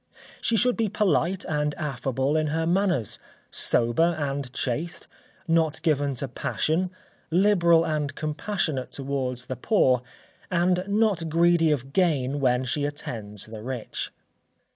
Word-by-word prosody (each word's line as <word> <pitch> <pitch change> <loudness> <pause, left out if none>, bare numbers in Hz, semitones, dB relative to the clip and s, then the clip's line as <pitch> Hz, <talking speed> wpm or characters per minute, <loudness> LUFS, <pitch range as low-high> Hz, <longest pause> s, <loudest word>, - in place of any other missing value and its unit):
She 230 - +1
should 250 +2 +3
be 225 -2 +1
polite 190 -2 +1
and 150 -1 -1
affable 135 -1 -1
in 155 -1 +2
her 160 +2 0
manners, 175 - +1 0.3
sober 160 +9 +2
and 140 -3 -3
chaste, 145 +6 -3 0.4
not 165 -2 +2
given 145 -4 +1
to 135 +3 -4
passion, 160 +7 -1 0.4
liberal 170 -2 +4
and 150 -3 -1
compassionate 155 -3 -2
towards 130 -3 -3
the 130 - -4
poor, 130 - +3 0.5
and 180 +1 +2
not 200 -5 +1
greedy 170 0 +4
of 135 -2 -1
gain 145 -7 +2
when 130 -1 +2
she 145 +4 -1
attends 110 -8 -4
the 110 -1 -9
rich. 125 -1 -4
150 Hz, 130 wpm, -26 LUFS, 130-175 Hz, 0.5 s, liberal